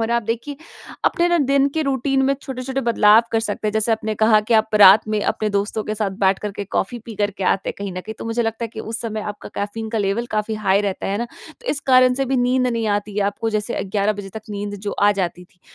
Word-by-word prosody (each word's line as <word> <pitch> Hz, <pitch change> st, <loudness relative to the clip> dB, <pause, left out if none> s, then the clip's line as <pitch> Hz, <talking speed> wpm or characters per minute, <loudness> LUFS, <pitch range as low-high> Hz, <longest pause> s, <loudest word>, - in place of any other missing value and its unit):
और 225 Hz, +1 st, -1 dB
आप 235 Hz, -1 st, +1 dB
देखिए 235 Hz, +6 st, -4 dB, 0.5 s
अपने 345 Hz, -1 st, +2 dB
ना 345 Hz, -, +3 dB
दिन 275 Hz, -1 st, +3 dB
के 315 Hz, -, +1 dB
रूटीन 270 Hz, 0 st, 0 dB
में 275 Hz, +1 st, +3 dB
छोटे-छोटे 265 Hz, 0 st, -4 dB
बदलाव 220 Hz, 0 st, +6 dB
कर 225 Hz, -, +2 dB
सकते 215 Hz, -1 st, -2 dB
हैं। -, -, -2 dB
जैसे 220 Hz, +1 st, +1 dB
आपने 220 Hz, 0 st, -2 dB
कहा 215 Hz, 0 st, +4 dB
कि 230 Hz, -, +3 dB
आप 220 Hz, 0 st, +2 dB
रात 200 Hz, +2 st, +8 dB
में 215 Hz, -1 st, 0 dB
अपने 215 Hz, -1 st, 0 dB
दोस्तों 205 Hz, +2 st, -1 dB
के 215 Hz, -, -3 dB
साथ 210 Hz, -2 st, -1 dB
बैठ 190 Hz, 0 st, +3 dB
करके 205 Hz, -1 st, -5 dB
कॉफ़ी 200 Hz, +4 st, -2 dB
पी 230 Hz, -, -8 dB
कर 205 Hz, 0 st, +1 dB
के 190 Hz, -, -2 dB
आते 195 Hz, -, -3 dB
हैं -, -, -3 dB
कहीं 200 Hz, -2 st, -4 dB
न 185 Hz, -, -5 dB
कहीं। 220 Hz, +4 st, -8 dB
तो -, -, -7 dB
मुझे 230 Hz, +1 st, -1 dB
लगता 225 Hz, +1 st, -2 dB
है 230 Hz, -, -4 dB
कि 220 Hz, -, -6 dB
उस 225 Hz, +1 st, -5 dB
समय 220 Hz, -2 st, -4 dB
आपका 210 Hz, 0 st, -7 dB
कैफ़ीन 220 Hz, +2 st, -4 dB
का 225 Hz, -, -1 dB
लेवल 205 Hz, +4 st, -1 dB
काफ़ी 215 Hz, +1 st, -1 dB
हाई 200 Hz, -2 st, +2 dB
रहता 200 Hz, -2 st, -3 dB
है 200 Hz, +2 st, -1 dB
ना। 235 Hz, -, -1 dB, 0.4 s
तो 485 Hz, -, -17 dB
इस 285 Hz, -, -2 dB
कारण 255 Hz, 0 st, +6 dB
से 270 Hz, +1 st, 0 dB
भी 265 Hz, 0 st, 0 dB
नींद 250 Hz, +1 st, +2 dB
नहीं 230 Hz, -2 st, -1 dB
आती 205 Hz, 0 st, -1 dB
है। -, -, +1 dB
आपको 225 Hz, +3 st, -2 dB
जैसे 215 Hz, -1 st, -2 dB
अ, -, -, -2 dB
11 200 Hz, +2 st, 0 dB
बजे 205 Hz, -1 st, -8 dB
तक 220 Hz, -, -6 dB
नींद 205 Hz, 0 st, -4 dB
जो 205 Hz, 0 st, -4 dB
आ 205 Hz, 0 st, +6 dB
जाती 180 Hz, -2 st, -3 dB
थी। 180 Hz, 0 st, -31 dB
220 Hz, 275 wpm, -21 LUFS, 205-235 Hz, 0.5 s, रात